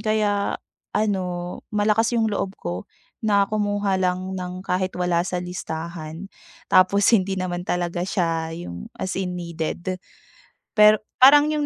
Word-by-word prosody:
kaya 210 -2 +1 0.4
ano, 180 -4 -1
malakas 215 +3 +2
yung 225 - +3
loob 195 -1 -2
ko 90 +1 -5 0.3
na 205 -2 +4
kumuha 205 -2 0
lang 185 0 -1
ng 180 0 -5
kahit 185 0 -1
wala 180 -1 +1
sa 180 - -2
listahan, 170 0 -6 0.3
tapos 195 +2 +4
hindi 190 -2 +3
naman 180 -1 -2
talaga 175 -1 -2
siya 165 -4 0
yung, 85 - -7
as 190 - -3
in 180 -1 -3
needed. 170 +2 -4 0.8
Pero 210 0 +7 0.2
parang 290 +3 +8
yung 300 -1 0
185 Hz, 135 wpm, -23 LUFS, 175-205 Hz, 0.8 s, parang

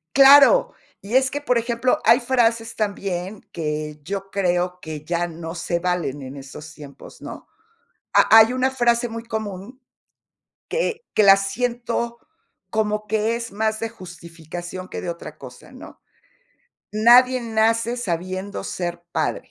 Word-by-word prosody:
Claro 280 - +7 0.3
y 210 +4 -6
es 265 0 +3
que 290 - -3
por 250 -4 0
ejemplo, 235 +2 0
hay 235 +3 +6
frases 230 -2 0
también 195 -2 -3
que 150 -1 -4
yo 195 +3 -5
creo 180 -2 0
que 155 -3 -7
ya 170 +2 -1
no 165 -1 -8
se 170 0 -2
valen 175 -6 -2
en 130 +1 -8
estos 145 +3 -10
tiempos, 145 -2 -13
¿no? - - -9 0.6
Ha - - +4
hay 220 +2 +6
una 255 +1 +1
frase 240 -2 +1
muy 230 0 -7
común 220 +1 -6 0.9
que 470 -1 -2
que - - +3
la 195 -1 +8
siento 235 +3 -2 0.5
como 215 -1 -1
que 220 +2 0
es 235 -2 -6
más 220 +1 -1
de 225 - -2
justificación 175 -2 -9
que - - -6
de - - -5
otra 170 0 -8
cosa, - - -13
¿no?: - - -13 0.9
"Nadie 245 +4 +5
nace 230 +1 +1
sabiendo 185 -2 -4
ser 175 -1 -5
padre". - - -2
210 Hz, 145 wpm, -22 LUFS, 175-235 Hz, 0.9 s, la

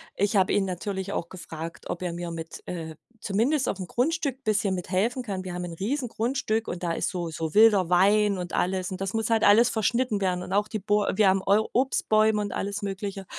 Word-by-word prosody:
ich 205 +2 0
habe 190 -1 +3
ihn 205 -1 +2
natürlich 190 +1 -4
auch 170 - -3
gefragt, 165 -2 -8
ob 175 - -4
er 175 -2 -3
mir 170 0 -5
mit, 165 0 -7
äh 160 -3 -5 0.3
zumindest 245 +7 +1
auf'm 190 -1 -2
Grundstück 275 - -1
bisschen 210 -2 +1
mithelfen 200 +8 -1
kann. 195 -4 -4
Wir 185 -1 -6
haben 180 0 -4
'n 170 - -7
Riesengrundstück 230 - -1
und 175 0 -5
da 170 -1 0
ist - - -1
so 175 -3 -3
so 160 -1 -4
wilder 210 -5 +5
Wein, 200 +2 +4
und 180 0 -6
alles 185 0 0
und 185 0 -6
das 195 -1 -2
muss 225 0 -1
halt 225 -1 +2
alles 225 +4 +6
verschnitten 225 0 0
werden 180 -2 0
und 185 - -6
auch 205 +1 +1
die 215 - -3
Bäu 205 +1 +1
wir 210 0 +4
haben 190 0 +3
Eu 210 +3 +3
Obstbäume 220 -4 +2
und 205 - -4
alles 200 +1 -3
Mögliche. 195 0 -5
200 Hz, 215 wpm, -26 LUFS, 180-220 Hz, 0.3 s, alles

